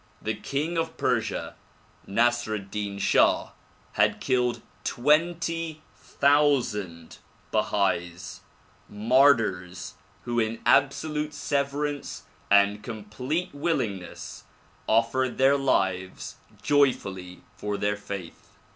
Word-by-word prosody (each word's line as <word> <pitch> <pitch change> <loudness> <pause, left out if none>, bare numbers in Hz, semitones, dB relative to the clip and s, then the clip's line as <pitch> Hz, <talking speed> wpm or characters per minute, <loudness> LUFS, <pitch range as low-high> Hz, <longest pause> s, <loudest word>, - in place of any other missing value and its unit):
The 110 - -2
king 150 +9 -2
of 165 0 -3
Persia, 115 -5 -1 0.5
Nasr 120 +1 +1
ed 100 -2 -8
Din 100 -1 -3
Shah 100 - +3 0.4
had - - +2
killed 125 -2 0 0.2
twenty 165 +3 0
thousand 130 - +1 0.3
Bahais, 85 0 -1 0.5
mar 130 +7 +5
tyrs 90 -5 -5 0.3
who 120 0 -1
in 110 0 -1
absolute 150 +2 +2
severance 145 +1 -2 0.3
and 100 +1 +4
complete 120 - -4
willingness 115 - -3 0.4
offered 115 +3 +2
their 135 +1 +5
lives 95 -9 -1 0.3
joyfully 100 -10 +1
for 105 -1 -3
their 105 0 0
faith. 100 -4 -8
120 Hz, 95 wpm, -26 LUFS, 100-145 Hz, 0.5 s, mar